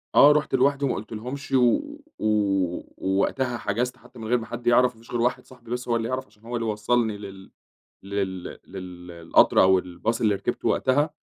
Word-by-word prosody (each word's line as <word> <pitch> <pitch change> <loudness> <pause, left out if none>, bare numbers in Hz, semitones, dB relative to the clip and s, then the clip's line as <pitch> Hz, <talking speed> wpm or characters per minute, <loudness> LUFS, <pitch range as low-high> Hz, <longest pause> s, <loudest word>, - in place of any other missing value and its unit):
آه، 145 - +9
رُحت 150 0 +1
لوحدي 140 0 +2
وما 135 - 0
قُلتلهمش 120 +6 -6
و 125 -2 +4 0.4
و - - -3 0.7
ووقتها 120 +6 0
حجَزت 125 +4 -2
حتى 125 - -16
من 110 - -6
غير 125 +2 +3
ما 115 - -6
حد 120 0 -7
يعرَف، 125 +1 +4
ما 110 - -19
فيش 115 - -16
غير 120 - -1
واحد 125 +1 0
صاحبي 120 -2 -15
بس 125 0 -3
هو 120 - +1
اللي 115 -1 -1
يعرَف 130 +1 -2
عشان 105 - -27
هو 120 +1 -5
اللي 115 -1 -2
وصّلني 110 +1 0
لل 95 -2 -11 0.5
لل 95 -2 -3 0.2
للقطر 90 -3 +1
أو 95 0 +5
الباص 90 +5 -3
اللي 105 -3 +3
ركِبته 100 - -2
وقتها 145 +4 +2
115 Hz, 190 wpm, -25 LUFS, 100-125 Hz, 0.7 s, آه